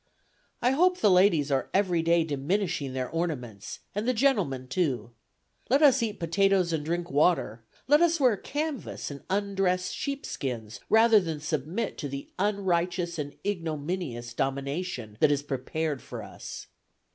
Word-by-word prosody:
I 250 - +4
hope 360 +6 +3
the 210 - +4
ladies 180 -6 +4
are 135 -1 0
every 185 -4 +2
day 170 0 +3
diminishing 155 0 -1
their 130 -1 -2
ornaments, 125 - -4
and 210 +3 -2
the 255 - +2
gentlemen, 200 - +1
too. 125 - -1 0.6
Let 275 +5 +4
us 270 -3 +6
eat 220 -3 -2
potatoes 185 +1 +2
and 155 -2 -1
drink 170 +2 -2
water; 140 -6 +2 0.2
let 295 +3 +5
us 335 -1 +3
wear 250 -5 +4
canvas, 290 - -4
and 140 - -8
undressed 195 -2 0
sheepskins, 130 - -4
rather 225 0 +6
than 165 -5 -3
submit 155 - -3
to 145 - -3
the 140 +1 -7
unrighteous 180 -4 0
and 145 -1 -4
ignominious 160 - -3
domination 135 - -3
that 155 - +5
is 145 0 +1
prepared 145 +1 -3
for - - -7
us. - - -8
170 Hz, 145 wpm, -28 LUFS, 140-205 Hz, 0.6 s, us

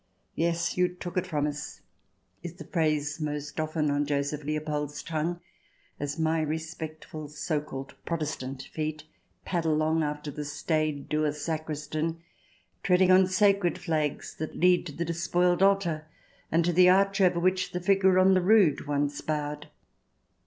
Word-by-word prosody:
" - - -44
Yes, 170 +1 0
you 180 0 +4
took 180 0 -7
it 185 0 0
from 150 -5 0
us 150 0 -5 0.6
1" 175 - -5
is - - -14
the - - -8
phrase 155 -2 0
most 150 0 -4
often 155 -1 0
on 145 0 0
Joseph 145 +1 -1
Leopold's 150 -1 -3
tongue, 165 +2 -2 0.6
as 145 0 -3
my 160 0 +1
respectful 155 0 -5
so 150 +1 -2
called 135 -2 -8
Protestant 140 -5 -4
feet 155 -1 -3 0.4
pad 175 -3 -1
along 155 0 +2
after 150 0 -3
the 150 +1 -5
staid, 150 0 -1
dour 150 -1 +1
sacristan, 155 +1 -3 0.6
treading 185 0 +4
on 185 0 +6
sacred 195 -1 +3
flags 155 -3 -2
that 155 - -4
lead 180 0 +3
to - - -6
the 170 +4 -3
despoiled 175 +2 +1
altar 185 -6 +2 0.4
and 165 +1 +3
to 175 - +1
the 180 +1 +7
arch 195 +1 +3
over 180 -2 +4
which 185 +1 +1
the 180 - -2
figure 190 0 +3
on 190 +1 +6
the 185 - +4
rood 180 -8 +4
once 145 0 -1
bowed. 150 -1 -3
155 Hz, 160 wpm, -28 LUFS, 150-175 Hz, 0.6 s, the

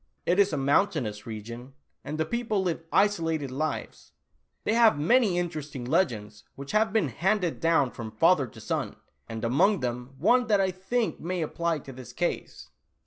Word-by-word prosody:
It 180 +3 +2
is 200 0 +4
a 150 - -1
mountainous 135 - +1
region, 115 +4 -8 0.3
and 150 +2 -5
the 160 - 0
people 220 0 -1
live 170 -3 -1
isolated 165 -8 +1
lives. 155 +4 -4 0.5
They - - +1
have 230 -6 +5
many 200 - +3
interesting 155 -7 -4
legends 110 - -1
which 140 0 -7
have 215 +1 +2
been 205 -9 +1
handed 180 - 0
down 165 -6 +2
from 115 -2 -7
father 140 +5 +3
to - - -14
son, - - -3 0.3
and 115 0 -4
among 175 - +3
them 125 +1 -4
one 245 - +3
that 210 -2 +3
I 190 -1 +2
think 210 +6 -2
may 175 0 -2
apply 170 +1 -1
to 135 - -8
this 125 -2 -11
case." - - -3
160 Hz, 170 wpm, -27 LUFS, 130-195 Hz, 0.5 s, have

